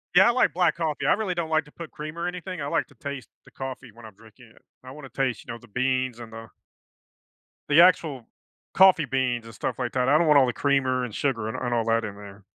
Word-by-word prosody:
Yeah, 190 +2 +7
I - - +5
like 250 - +2
black 175 -3 +2
coffee. 160 -3 -2
I - - +5
really 200 -3 -2
don't 170 -2 -3
like 155 0 +2
to 150 - -18
put 165 0 -9
cream 155 +2 -8
or 170 +1 -2
anything. 180 -1 -6
I 140 - -3
like - - 0
to - - -22
taste 140 -2 -7 0.2
the - - -18
coffee 130 -2 -7
when 115 0 -14
I'm 110 - -12
drinking 115 +4 -18
it. - - -23 0.2
I 130 - -10
wanna 140 0 -10
taste, 130 -3 -2
you - - -6
know, - - -7
the 115 -1 -19
beans 130 +1 -1
and 115 -1 -10
the 115 0 -9 1.2
the 150 +3 +7
actual 155 -8 +3 0.5
coffee 185 -4 +6
beans 125 -3 -1
and 115 - -11
stuff - - -4
like 125 -2 -3
that. 125 0 +1
I 145 - +5
don't 165 +1 +2
want 150 -2 +6
all 130 - +4
the 125 - -1
creamer 130 -2 +1
and 120 -4 -5
sugar 115 -5 -1
and 110 - -4
and 120 -1 -2
all 115 -1 0
that 115 0 +1
in 100 -2 -7
there. 100 0 -12
130 Hz, 265 wpm, -25 LUFS, 115-155 Hz, 1.2 s, Yeah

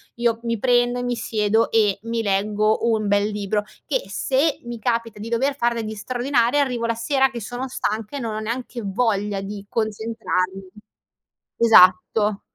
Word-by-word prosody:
io 235 -1 0
mi 230 -1 -1
prendo 245 0 +2
e - - -3
mi 245 0 -1
siedo 220 0 +1
e 210 -3 +2
mi 230 0 -2
leggo 210 +3 +1
un 215 -2 0
bel 205 0 +3
libro 210 0 -2 0.2
che - - -1
se 275 +3 0
mi 240 -1 -6
capita 230 -2 -2
di 215 - -6
dover 260 +5 +1
far 240 -3 +1
degli 220 -1 -4
straordinari 245 +3 0
arrivo 250 -4 0
la 230 0 0
sera 270 +3 +2
che 240 -2 -6
sono 245 +5 -5
stanca 220 -1 -3
e - - -4
non 225 -2 -3
ho - - -2
neanche 240 +2 -4
voglia 205 -1 0
di 200 0 -7
concentrarmi. 210 -4 -2 0.9
Esatto. 210 -1 +5
225 Hz, 165 wpm, -22 LUFS, 210-240 Hz, 0.9 s, Esatto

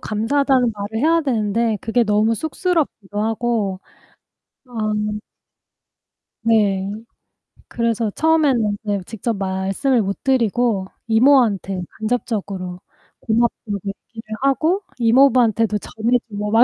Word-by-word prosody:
감사하다는 250 +3 +1
말을 210 +1 -5
해야 330 +1 +4
되는데 225 -4 0
그게 240 -1 +1
너무 215 +1 +2
쑥스럽기도 295 - -2
하고. 220 -4 -1 0.9
아. 250 - -21 1.7
네. 200 -4 +2 0.8
그래서 230 -1 -1
처음에는 275 -9 +2
이제 205 -2 -1
직접 225 +3 -3
말씀을 195 +7 0
못 195 -1 -4
드리고 235 -5 +1 0.2
이모한테 225 -6 +3 0.2
간접적으로 200 -6 -3 0.4
고맙다고 225 -2 0
얘기를 215 +2 -7
하고 315 +8 +2 0.2
이모부한테도 230 -3 +4
전해 225 +4 0
주고 210 0 -4
막 225 +2 +6
225 Hz, 260 characters per minute, -20 LUFS, 205-250 Hz, 1.7 s, 막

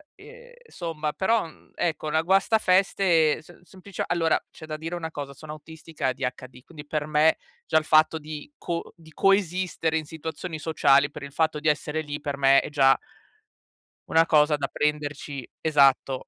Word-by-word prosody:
ehm, 485 +5 -15 0.2
somma, 160 - -4
però, 225 +4 +1
uhm, 160 - -16
ecco, 155 -2 -2
una 160 +1 +1
guastafeste 190 -4 +3
s 175 +2 -18
semplice 185 +1 -7
allora 165 -2 +1
c'è 155 - -12
da 155 -1 -5
dire 165 +3 -5
una 160 -2 -5
cosa, 140 -3 -6
sono 150 +3 -11
autistica 160 -2 -6
ADHD, 125 -1 -5
quindi 150 -1 -12
per 150 0 -2
me 155 +1 +3 0.3
già 160 - +3
il 160 - +2
fatto 155 +1 +4
di 155 - -9
co 170 -1 -5
di 160 -2 -18
coesistere 185 -4 +1
in 155 - -4
situazioni 160 +2 -6
sociali, 140 -2 +3
per 150 - -9
il 140 - -8
fatto 160 0 0
di 155 - -3
essere 150 +1 0
lì 145 -1 -6
per 145 -1 -4
me 135 0 +5
è - - -7
già 135 -3 +4 1.1
una 165 0 +4
cosa 150 -1 +3
da 140 -1 -2
prenderci 145 -3 -3
esatto, 140 -3 +2
155 Hz, 170 wpm, -25 LUFS, 145-170 Hz, 1.1 s, me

